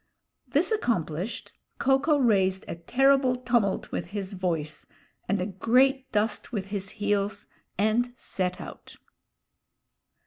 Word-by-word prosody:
This 295 - +1
accomplished, 205 - -1 0.3
Ko 270 0 +3
ko 295 +1 +3
raised 190 -7 +2
a - - -3
terrible 260 +9 +3
tumult 240 -5 0
with - - -3
his 200 -1 -5
voice 165 -5 -3 0.4
and 200 +1 +2
a 180 - 0
great 255 +7 +2
dust 210 +1 -1
with 205 -5 -2
his 200 -1 -3
heels, 205 0 0 0.3
and 220 +5 +2
set 180 -1 -3
out. - - -10
210 Hz, 125 wpm, -27 LUFS, 190-255 Hz, 0.4 s, Ko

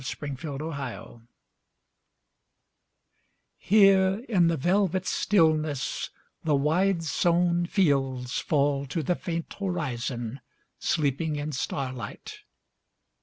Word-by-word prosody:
THE - - -6
INDIA 145 +2 -5
WHARF 140 -6 -6 2.4
HERE 195 -1 +5
in 180 -7 +3
the 165 -1 +1
velvet 185 +4 +1
stillness 155 -9 +1 0.3
The 155 -2 +2
wide 165 +5 +2
sown 175 +2 +2
fields 135 -9 +1
fall 140 -2 +1
to 160 +4 -2
the 180 - +1
faint 170 -2 -4
horizon, 130 - -3 0.4
Sleeping 155 0 0
in 145 +1 -3
starlight. 130 -4 -5
155 Hz, 90 wpm, -27 LUFS, 140-175 Hz, 2.4 s, HERE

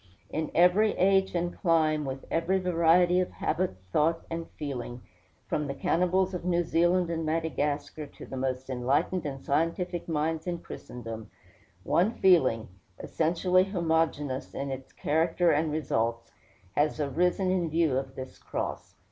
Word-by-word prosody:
In 155 0 -2
every 185 +5 +5
age 190 0 +3
and 175 0 -1
clime, 155 -4 +2
with 135 0 -5
every 170 +4 +1
variety 180 0 +3
of 185 - 0
habit, 185 - -1 0.2
thought, 165 +2 +2
and 165 0 -4
feeling, 125 -4 -5 0.5
from 150 -1 -1
the 140 - -4
cannibals 180 +5 +1
of 180 - -4
New 175 -1 +1
Zealand 175 +1 +2
and 165 -1 -2
Madagascar 150 -2 -2
to - - -12
the - - -8
most 130 0 -2
enlightened 140 +7 0
and 135 -1 -5
scientific 170 +4 -1
minds 160 +1 -1
in 175 -1 -1
Christendom, 115 -8 -8 0.5
one 190 - +2
feeling, 130 -12 +4 0.3
essentially 180 +3 +2
homogeneous 160 -7 -1
in 140 0 -3
its 135 0 -7
character 165 +3 +1
and 155 +1 +1
results, 115 -6 -1 0.4
has 150 +1 +1
arisen 180 +6 +1
in 175 -3 0
view 160 -3 +2
of 135 0 -3
this 130 0 -8
cross. - - -5
160 Hz, 145 wpm, -28 LUFS, 140-175 Hz, 0.5 s, every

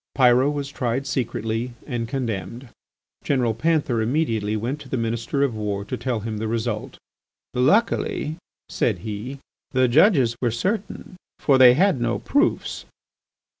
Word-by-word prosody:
Pyrot 130 +1 +5
was 145 -1 -4
tried 125 0 -2
secretly 115 -2 -2
and 120 -4 -3
condemned. 115 -1 -4 0.5
General 125 -5 +1
Panther 145 -4 +1
immediately 110 -5 0
went 125 +7 -3
to - - -12
the 130 - -1
Minister 115 +4 -1
of 135 -4 +1
War 105 -2 -3
to 130 - -4
tell 120 -2 -2
him 110 0 -4
the 110 +1 -3
result. 115 -1 -3 0.6
"Luckily," 155 - +1 0.3
said - - 0
he, 110 +6 -5 0.4
"the 130 -1 +4
judges 135 - +4
were 120 - +2
certain, 185 - -3 0.2
for 135 -3 +3
they 125 -1 +8
had 185 -4 +2
no 120 0 0
proofs." 290 +4 0
125 Hz, 140 wpm, -23 LUFS, 115-140 Hz, 0.6 s, they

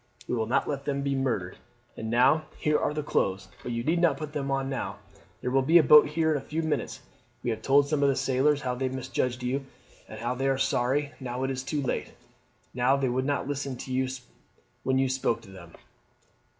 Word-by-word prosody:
We - - -2
will 110 -2 0
not 120 - +1
let 140 -1 -3
them 140 -1 -1
be 140 0 0
murdered. 120 -9 -1 0.4
And 110 - -5
now 130 +7 +4
here 150 0 +1
are - - 0
the 150 0 -3
clothes, 95 -8 -1
but 120 - -5
you 115 0 -2
need 170 +5 +1
not 160 -6 +3
put 155 0 -6
them 140 -2 -2
on 135 -1 0
now. 135 -1 -4 0.4
There 125 - -2
will 135 +1 +4
be 160 +6 +5
a 165 - +6
boat 150 +2 +8
here 160 +1 +1
in 150 - +2
a - - -12
few 160 +2 -3
minutes. 160 -1 -2 0.4
We 120 - 0
have 110 -1 -4
told 140 +3 +4
some 145 -1 0
of 140 - +4
the 135 - +2
sailors 135 +2 +2
how 125 -2 -1
they 130 +1 -1
misjudged 130 -1 -2
you, 135 +2 -2 0.4
and 120 +4 -4
they 135 - +1
are 135 -1 +2
sorry, 135 +2 +1
now 125 -1 -4
it 135 - 0
is 130 -1 -3
too 145 +2 -2
late, 130 - -2 0.6
that 130 +3 +2
they 135 -2 +1
would 130 +2 0
not 140 -2 -1
listen 140 -2 -3 1.0
when 130 0 +1
you 135 0 +3
spoke 130 -3 0
to 100 -4 -14
them. 85 -3 -12
135 Hz, 220 wpm, -28 LUFS, 125-145 Hz, 1.0 s, boat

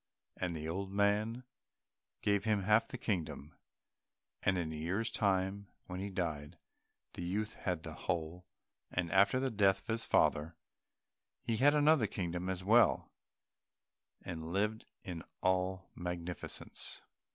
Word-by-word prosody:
And 90 -2 -2
the 80 0 -4
old 95 +4 -3
man 105 +4 +1 0.8
gave 100 -1 +2
him 105 -2 +1
half 105 +3 +4
the - - -6
kingdom, 85 -8 -3 0.9
and 95 -1 +2
in 80 -3 -2
a - - -5
year's 90 +9 -1
time, 100 -2 +1 0.2
when 90 0 -5
he 100 +1 -3
died, 80 -4 -3 0.6
the - - -6
youth 105 +5 -2
had 90 -4 -3
the - - -6
whole, 85 +2 -3 0.4
and 90 -2 -1
after 100 +7 +5
the 130 0 0
death 100 -3 +3
of - - -25
his 115 +1 0
father 80 +3 +2 0.9
he 115 - 0
had 145 +4 +5
another 150 -5 +5
kingdom 90 -1 -3
as 95 -1 -3
well, 115 +5 +4 1.1
and 80 -1 -5
lived 105 +4 0 0.2
in 85 -3 -5 0.2
all 95 0 +1
magnificence. 90 0 -5
95 Hz, 140 wpm, -34 LUFS, 85-105 Hz, 1.1 s, after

